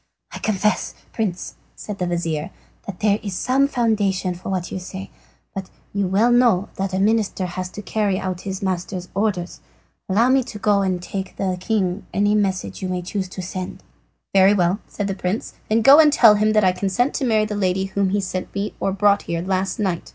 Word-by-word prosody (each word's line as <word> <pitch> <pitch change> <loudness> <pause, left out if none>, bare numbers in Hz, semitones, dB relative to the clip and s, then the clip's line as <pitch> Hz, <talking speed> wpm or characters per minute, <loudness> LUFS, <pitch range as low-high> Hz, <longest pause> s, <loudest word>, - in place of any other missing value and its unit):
"I - - -7
confess, 210 0 0 0.2
Prince," 195 -5 -3 0.2
said 210 -2 -7
the 180 - -1
vizir, 170 -2 -2 0.4
"that 200 -3 -7
there 210 -1 +3
is 200 -3 -4
some 265 +7 +2
foundation 205 -8 0
for 175 +2 -8
what 185 -2 -2
you - - -3
say. 190 +1 -8 0.4
But 195 -2 -6 0.2
you 200 -1 0
know 205 +6 +3
well 235 -6 +3
that 190 -1 -2
a - - 0
minister 210 -2 +1
has 180 +1 -4
to 210 - -9
carry 200 -1 0
out 185 -1 -3
his 190 0 -5
master's 185 -1 -3
orders. 195 -3 -2 0.5
Allow 225 +6 +3
me 265 0 +4
to 215 - -8
go 205 -1 +2
and 185 -2 0
to 175 - -10
take 190 -1 -5
to 195 -1 -1
the - - -2
king 190 -1 -1
any 205 +1 +3
message 190 - -1
you 185 - -3
may 180 -1 -2
choose 190 +1 -3
to 185 0 -6
send." 185 0 -6 0.5
"Very 195 +1 +6
well," 180 +1 +2
said 205 - -4
the 195 - -1
prince; 190 +3 -3 0.2
"then 220 +1 +2
go 275 +5 +9
and 305 -2 +7
tell 230 -7 +7
him 215 +1 +2
that 215 -1 +4
I 185 - +5
consent 195 +8 0
to - - -2
marry 215 -3 +3
the 210 - -4
lady 190 -2 0
whom 195 0 0
he 200 +1 +1
sent 185 -1 -3 0.3
or 195 - 0
brought 200 +1 +3
here 170 0 -1
last 190 +1 -1
night. 185 -5 -2
195 Hz, 210 wpm, -21 LUFS, 185-210 Hz, 0.5 s, go